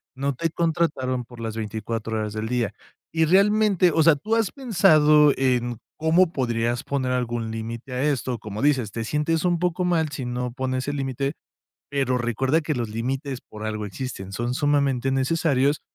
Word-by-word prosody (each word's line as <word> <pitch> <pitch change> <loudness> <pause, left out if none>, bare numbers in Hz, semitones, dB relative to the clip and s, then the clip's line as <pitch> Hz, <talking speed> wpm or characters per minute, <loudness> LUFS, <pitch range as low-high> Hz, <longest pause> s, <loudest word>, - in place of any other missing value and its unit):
no 140 +1 -1
te 165 +5 -1
contrataron 155 -7 0
por 120 0 -14
las 115 -1 -4
24 110 +1 -3
horas 105 -1 -3
del 110 0 -3
día, 120 -3 0 0.4
y 160 0 +2
realmente 200 0 +4
o 160 0 +3
sea, 165 -2 +6
tú 215 +10 -1
has 225 -4 +1
pensado 155 - +5
en, 120 -3 0 0.2
cómo 165 +2 +3
podrías 120 -2 -1
poner 130 -2 -1
algún 120 -2 -1
límite 115 +3 -6
a 125 +2 -1
esto, 130 -4 0
como 105 -1 -6
dices, 130 -7 +2
te 115 +2 -4
sientes 155 +6 0
un 175 -1 +2
poco 180 +1 0
mal 165 -3 +1
si 140 -3 -5
no 125 0 -3
pones 130 +1 -2
el 145 - -2
límite, 135 0 -2 0.6
pero 135 -3 0
recuerda 130 +6 +1
que 155 0 -1
los 120 -5 -3
límites 130 +4 -3
por 110 0 -8
algo 110 -1 -3
existen, 100 -2 -6
son 120 +3 -2
sumamente 140 -3 +1
necesarios, 140 +1 +1
130 Hz, 175 wpm, -24 LUFS, 120-155 Hz, 0.6 s, sea